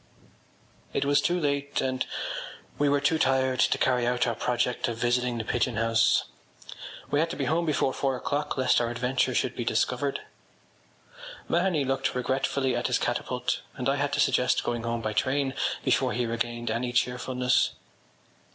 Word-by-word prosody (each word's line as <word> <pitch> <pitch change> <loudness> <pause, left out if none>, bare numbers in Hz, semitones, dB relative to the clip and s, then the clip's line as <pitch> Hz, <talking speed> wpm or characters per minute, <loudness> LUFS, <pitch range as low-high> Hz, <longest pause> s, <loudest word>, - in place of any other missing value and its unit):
It - - 0
was 145 0 +3
too 175 +1 +1
late 140 -2 -1
and 130 -1 -1 0.7
we 145 -1 +3
were 145 0 +3
too 155 +3 +1
tired 130 -1 +2
to - - +3
carry 125 -2 +2
out 125 0 +1
our 120 - 0
project 125 +1 -1
of 115 -1 -3
visiting 120 0 +1
the 115 - -2
Pigeon 120 +1 0
House. 115 0 +3 0.9
We 145 - +2
had 165 +2 +1
to 175 - -4
be 140 - -2
home 165 +5 0
before 140 -3 +1
four 135 -1 0
o’clock 145 +3 -2
lest 130 -1 +3
our 120 - 0
adventure 125 +2 0
should - - 0
be - - -3
discovered. - - 0 1.3
Mahony 170 -5 +1
looked 135 0 -1
regretfully 130 +1 0
at 120 - 0
his 125 - +2
catapult 125 +1 -2
and 125 - -3
I 135 +1 +2
had 145 0 0
to - - 0
suggest 125 -1 +2
going 120 -1 -2
home 115 0 -2
by 110 -1 -2
train 135 +3 0 0.3
before 130 -2 +2
he 120 0 0
regained 120 0 -2
any 120 +2 -1
cheerfulness. 125 +1 +1
130 Hz, 170 wpm, -27 LUFS, 120-140 Hz, 1.3 s, was